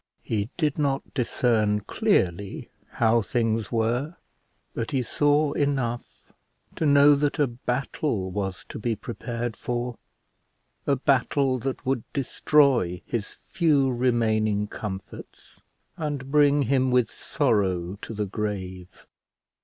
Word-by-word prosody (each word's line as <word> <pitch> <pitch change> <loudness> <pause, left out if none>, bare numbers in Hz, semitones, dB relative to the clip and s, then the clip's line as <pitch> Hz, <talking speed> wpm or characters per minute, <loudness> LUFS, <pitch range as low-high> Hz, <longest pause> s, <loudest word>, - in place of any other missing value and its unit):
He 105 0 -2
did 155 -3 0
not 140 -2 -1
discern 110 -5 +1
clearly 100 - 0 0.2
how 115 0 +3
things 115 0 -1
were, 120 +7 0 0.6
but 115 - -3
he 135 -4 0
saw 145 +4 +2
enough 135 -5 -2 0.5
to 160 - +1
know 145 0 +7
that 145 +1 0
a 145 - +4
battle 125 -4 -2
was 95 -2 -4
to - - -6
be 115 +1 -1
prepared 120 +1 -5
for; 120 -2 -3 0.9
a 140 - +4
battle 135 0 +1
that 135 +2 -4
would 130 -2 0
destroy 135 - +2
his 115 -3 -3
few 145 -6 +1
remaining 110 -4 +1
comforts, 100 -2 -8 0.4
and 145 -4 -4
bring 145 -1 +4
him 130 +1 +2
with 125 -3 +2
sorrow 100 - 0
to 115 - -7
the 105 0 -1
grave. 95 -3 -5
120 Hz, 120 wpm, -25 LUFS, 105-140 Hz, 0.9 s, know